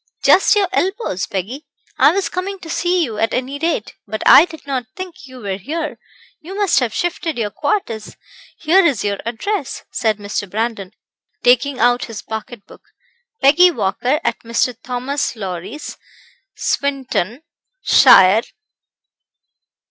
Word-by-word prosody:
"Just 390 - +5
your 405 -2 +2
elbows, 380 - -1
Peggy. 235 - -5 0.3
I - - +7
was 390 +2 -1
coming 390 +2 -4
to 325 - -7
see 355 +1 +1
you 225 -7 -4
at 225 - 0
any 260 +3 -3
rate, 325 -8 -2
but 215 +2 -4
I 320 - +9
did 320 -5 -13
not 260 -4 -3
think 370 -3 -8
you 255 -1 -12
were 195 -3 -3
here. 305 - -5 0.4
You 365 +5 -9
must 405 -3 +2
have 245 -4 -1
shifted 330 0 -2
your 210 -3 -2
quarters. 230 - -3 0.4
Here 360 +5 +4
is 275 -11 +1
your 200 -1 -1
address," 290 - -3
said 220 -3 0
Mr. 205 -1 -4
Brandon, 215 -2 -3 0.5
taking 255 +2 +3
out 245 +1 +3
his 225 -2 -8
pocket 220 0 -7
book - - -16 0.6
"'Peggy 315 +7 +7
Walker, 245 - -1
at - - -1
Mr. 230 +1 -1
Thomas 255 +2 -3
Lowrie's, 190 - -6 0.6
Swinton, 270 - -2 0.4
shire.' 190 +3 +7
255 Hz, 140 wpm, -18 LUFS, 220-330 Hz, 0.6 s, I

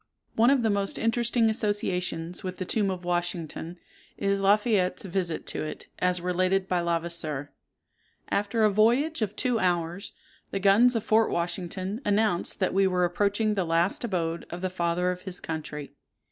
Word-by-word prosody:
One 230 +2 +4
of 270 -3 +3
the 220 - +2
most 200 -1 -1
interesting 230 0 +2
associations 180 -6 -1
with 185 -1 -5
the 185 - -4
tomb 205 +1 0
of 180 -2 -4
Washington, 175 -1 -3 0.4
is 200 0 0
La 200 +2 +5
Fayette's 205 -4 0
visit 180 -3 -2
to - - -3
it, 155 - -7
as 180 -1 +1
related 185 +2 +1
by 180 -2 +1
Levasseur:— 165 -4 -2 0.8
"After 205 +2 0
a 215 - +5
voyage 240 +9 +2
of 210 -2 -1
two 250 -3 +1
hours, 175 0 -1 0.4
the 195 - -2
guns 210 +6 +5
of 225 - 0
Fort 220 0 +3
Washington 185 +5 -3
announced 205 -3 +1
that 185 - 0
we 195 0 +4
were 180 -1 +2
approaching 205 +4 +1
the 195 -3 0
last 170 +5 +1
abode 170 -6 -2
of 175 - -6
the 185 -1 -2
father 180 0 0
of 180 0 -6
his 185 -2 -6
country. 150 -2 -6
185 Hz, 170 wpm, -27 LUFS, 175-210 Hz, 0.8 s, La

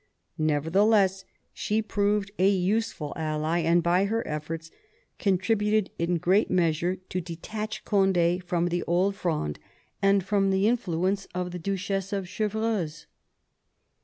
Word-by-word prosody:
Nevertheless 190 +6 +2 0.3
she 215 +1 -1
proved 205 -2 0
a 190 +1 +5
useful 190 -5 0
ally, 155 +1 -1
and 170 +1 +3
by 180 +3 +3
her 225 +3 -1
efforts 160 +2 -5 0.5
contributed 210 +2 +1
in 170 +1 +1
great 185 +6 +2
measure 175 0 +1
to 185 - -2
detach 210 +6 -6
Cond^ 185 -3 +2
from 175 0 0
the 175 0 -1
Old 185 +4 +1
Fronde 155 - -2 0.4
and 195 -1 +4
from 195 0 +1
the 190 +2 +2
influence 195 -4 0
of 180 0 -2
the 180 - -5
Duchess 195 +1 -2
of 195 -2 -1
Chevreuse. 210 -6 -2
185 Hz, 130 wpm, -27 LUFS, 170-200 Hz, 0.5 s, a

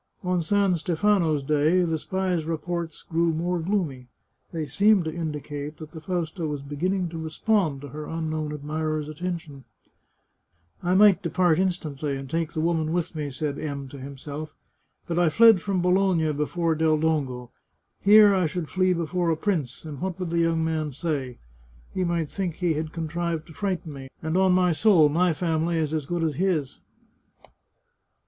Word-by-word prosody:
On 180 -1 +1
San 200 +2 +2
Stefano's 170 -2 +1
Day 155 +5 +3
the 165 -2 -1
spies' 185 -2 -1
reports 165 0 -4
grew 165 0 +1
more 175 +2 -1
gloomy; 160 -8 -2 0.4
they 160 -2 -3
seemed 195 +6 +3
to 160 - -3
indicate 150 -2 -5
that 155 -1 -10
the 160 - -9
Fausta 170 -1 -3
was 145 -2 -4
begin 145 +7 -1
ning 185 -3 -1
to 165 0 -6
respond 160 -2 0
to 145 - -8
her 150 +3 -7
unknown 155 -2 -3
admirer's 155 +1 -3
attentions. 155 -3 -5 0.7
" - - -49 0.3
I 180 +1 +1
might 205 -1 +6
depart 175 -1 +2
instantly, 155 -6 -1
and 135 0 -7
take 165 +3 -2
the 155 - -1
woman 160 -1 0
with 175 0 -1
me," 150 -3 -3
said 140 +1 -3
M 140 -3 -4
to 140 - -10
himself, 140 +3 -7 0.3
" - - -44
but 170 0 0
I 175 -2 +4
fled 225 +2 +6
from 190 -2 -1
Bologna 180 -4 +2
before 165 +3 0
Del 160 0 +2
Dongo. 135 -6 -1 0.5
Here 210 0 +7
I 185 -3 +2
should 165 0 -4
flee 185 0 +2
before 170 +1 -1
a 160 - +1
prince, 160 - -2
and 145 -4 -7
what 190 -1 -3
would 180 -3 -3
the 170 - +1
young 165 -1 +2
man 155 -3 -2
say? 135 -4 -3 0.6
He 185 - 0
might 170 -3 -1
think 185 -5 -3
he 175 -2 0
had 155 +1 -3
contrived 165 0 -3
to 160 - -14
frighten 185 -5 -3
me, 135 -1 -9
and 160 +1 -1
on 190 0 +4
my 180 -1 +3
soul, 165 -2 +5
my 175 +4 +2
family 165 0 0
is 155 -1 -1
as 155 -3 -2
good 175 0 -1
as 155 -4 -1
his 170 -7 0
160 Hz, 180 wpm, -25 LUFS, 150-180 Hz, 0.7 s, Here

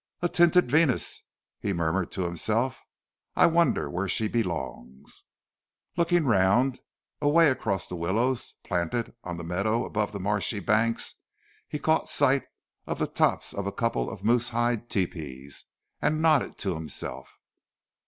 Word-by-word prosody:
"A - - +4
tinted 175 -5 +4
Venus!" 150 -4 +2 0.3
he 100 - -1
murmured 85 +2 0
to 95 - -1
himself. 110 +9 -1 0.5
"I - - +6
wonder 170 0 +2
where 90 +3 -2
she 110 +4 +1
belongs." 80 - -4 0.7
Looking 170 -2 +2
round, 115 +4 +3 0.4
away 150 +1 +5
across 100 -8 -2
the 90 - -6
willows, 115 +9 -1
planted 90 +6 -2
on 85 -1 -5
the 85 - -6
meadow 100 +7 0
above 105 -1 -1
the 100 - -5
marshy 105 +2 0
banks, 110 +4 +1 0.5
he - - -4
caught 160 +2 +1
sight 140 -1 +3 0.4
of - - -2
the - - 0
tops - - 0
of 100 0 -3
a - - -1
couple 100 - -1
of - - -9
moose 120 +1 +2
hide 120 0 -1
tepees, 70 - -4 0.4
and 155 +1 +1
nodded 155 -3 +2
to 95 -3 -1
himself. 80 -1 -7
110 Hz, 145 wpm, -27 LUFS, 90-130 Hz, 0.7 s, I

